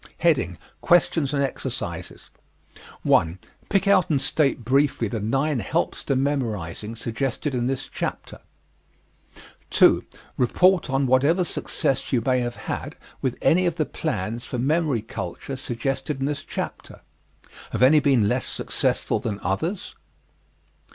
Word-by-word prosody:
_ - - +2 0.2
QUESTIONS 165 -5 +3
AND 140 -1 +1
EXERCISES 135 - -5 0.7
1. 85 +3 +3 0.3
Pick 195 0 +2
out 200 -2 +4
and 145 -4 +2
state 135 -4 +1
briefly 135 -1 +2
the 110 +2 -3
nine 135 +6 0
helps 95 - -1
to 135 - +1
memorizing 115 - -2
suggested 130 +5 -2
in 120 -1 0
this 135 0 -2
chapter. - - -5 1.3
2. - - +5 0.3
Report 180 +8 +3
on 135 +1 +1
whatever 140 +8 +3
success 145 -4 -2
you 125 - +3
may 125 +2 +1
have 120 -1 -2
had - - -4 0.3
with 130 -2 -1
any 180 +2 +4
of 170 - -1
the 155 -3 0
plans 120 -8 -3
for 125 - -5
memory 140 -2 +1
culture 110 +5 -6
suggested 135 +3 -3
in 135 - -1
this 145 0 -2
chapter. - - -6 0.7
Have - - 0
any 150 +4 +7
been 135 -7 +3
less - - 0
successful - - -1
than 105 -3 -3
others? 165 - -2
135 Hz, 135 wpm, -24 LUFS, 120-150 Hz, 1.3 s, any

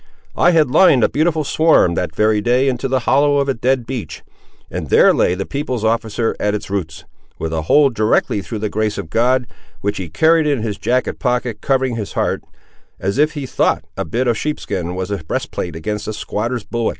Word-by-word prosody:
I - - +4
had 160 -6 +3
lined 140 -7 +5
a - - +4
beautiful 155 +1 +1
swarm 155 - +3
that 90 - -3
very 105 0 +2
day 125 +5 +2
into 130 0 -1
the 130 -1 0
hollow 145 +3 +3
of 140 0 +1
a 135 - +1
dead 130 +1 0
beech, 125 -4 -6 0.5
and - - -5
there - - +6
lay 90 - +2
the 95 +1 -4
people's 130 -5 -3
officer 115 0 0
at 105 0 0
its 105 -2 -6
roots, 80 -6 -4 0.3
with 80 0 -4
a 80 - -1
hole 140 - +4
directly 110 -2 +1
through 110 +3 -6
the 105 0 -2
'grace 110 0 -1
of 80 - -6
God;' 125 +4 +2 0.4
which 100 +1 -2
he 90 -3 -5
carried 160 - +3
in 140 -7 0
his 105 -3 -4
jacket 125 +1 -1
pocket 125 -4 -1
covering 130 -3 0
his 105 -3 -5
heart, - - -1 0.6
as 100 +7 -2
if 155 +1 +3
he 145 -3 -5
thought - - 0
a - - -2
bit 120 +10 -2
of 120 - +2
sheepskin 90 - -3
was 95 +2 -4
a 100 - 0
breastplate 80 +1 -4
against 105 +6 -4
a 110 - -3
squatter's 115 +3 -3
bullet! 115 +2 -2
115 Hz, 210 wpm, -18 LUFS, 105-135 Hz, 0.6 s, there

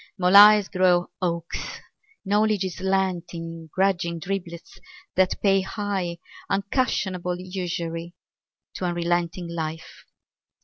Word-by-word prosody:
Mole 180 0 +3
eyes 210 -1 +9
grow 180 -2 +2
hawk's; 170 -2 -3 0.5
knowledge 210 0 +2
is 185 - -6
lent 190 -2 -1
In 165 -1 -7
grudging 175 -3 0
driblets 175 -1 -6 0.3
that 185 0 +2
pay 195 -1 +4
high 190 -3 -3 0.3
Unconscionable 195 -4 -1
usury 175 -2 -4 0.6
To 185 - -3
unrelenting 175 0 -1
life. 160 -1 -6
180 Hz, 100 wpm, -24 LUFS, 170-195 Hz, 0.6 s, eyes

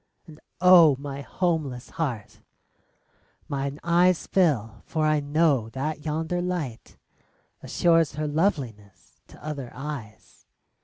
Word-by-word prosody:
and 155 -3 -14 0.2
oh, 175 -5 +7
my 140 0 -6
homeless 145 -3 -2
heart 135 - -4 1.1
1 140 - -2
Mine 140 +1 -4
eyes 175 +1 +3
fill, 140 - +1
for 155 -1 0
I 155 0 +3
know 145 -5 +1
that 150 +2 -3
yonder 160 +3 -2
light 170 -10 -4 0.6
Assures 165 -3 +2
her 155 0 -2
loveliness 125 - -3
to - - -15
other 140 -5 -5
eyes. 135 -6 -9
150 Hz, 115 wpm, -25 LUFS, 135-165 Hz, 1.1 s, oh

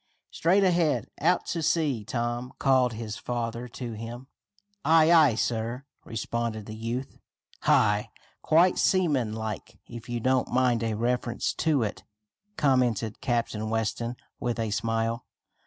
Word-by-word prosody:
"Straight 185 +5 +3
ahead, 175 -4 +2
out 175 +4 +2
to 170 - -2
sea, 150 -8 +1
Tom," 120 +3 -3
called 130 -3 +3
his 110 -1 -5
father 120 0 -3
to 120 -1 -6
him. 115 +3 -7 0.6
"Aye, 160 0 +5
aye, 155 -8 +6
sir," 115 +3 -2 0.2
responded 115 0 -3
the 110 - -7
youth. 115 +4 -5 0.5
"Ha! - - +3 0.3
Quite 175 +3 +4
seaman 145 - +2
like, 110 -1 -5
if 120 +1 -9
you 120 0 -2
don't 130 +2 +2
mind 125 -2 +2
a 115 -1 -1
reference 120 +1 -1
to 150 -6 +1
it," 105 - -4 0.5
commented 125 -6 +1
Captain 115 -3 -1
Weston 115 +2 -1 0.2
with 120 -2 -2
a 110 -2 -2
smile. 115 +2 -1
120 Hz, 135 wpm, -27 LUFS, 115-135 Hz, 0.6 s, aye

